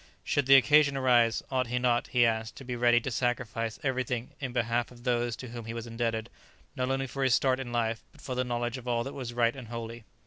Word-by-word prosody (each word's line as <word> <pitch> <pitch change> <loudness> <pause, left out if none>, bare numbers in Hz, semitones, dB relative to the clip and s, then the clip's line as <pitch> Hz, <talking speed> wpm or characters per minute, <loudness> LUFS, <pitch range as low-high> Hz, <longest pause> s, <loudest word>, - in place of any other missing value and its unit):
Should 145 -2 0
the 135 - +9
occasion 140 +1 +5
arise, 120 -3 +3
ought 130 -2 +1
he 125 +1 -1
not, 125 -1 +1
he 120 -1 +3
asked, 110 -1 -1
to - - -10
be 125 -1 -4
ready 120 0 +4
to 135 - -4
sacrifice 115 -2 -2
everything 130 -3 -2
in 130 -3 -4
behalf 120 0 0
of 120 -1 -15
those 120 -2 0
to 130 - -9
whom 120 -1 -7
he 115 +1 -5
was 115 0 -5
indebted 115 -1 -2 0.5
not 130 0 -1
only 135 0 0
for 135 +1 -3
his 130 -3 +4
start 130 -1 +2
in 125 -2 -5
life, 115 -1 -1
but - - -21
for 130 - -5
the 125 0 0
knowledge 120 0 -2
of 125 - -13
all 120 -1 +1
that 135 - -6
was 125 -3 -5
right 120 0 +2
and 130 -4 -9
holy? 115 0 -6
120 Hz, 245 wpm, -29 LUFS, 115-130 Hz, 0.5 s, the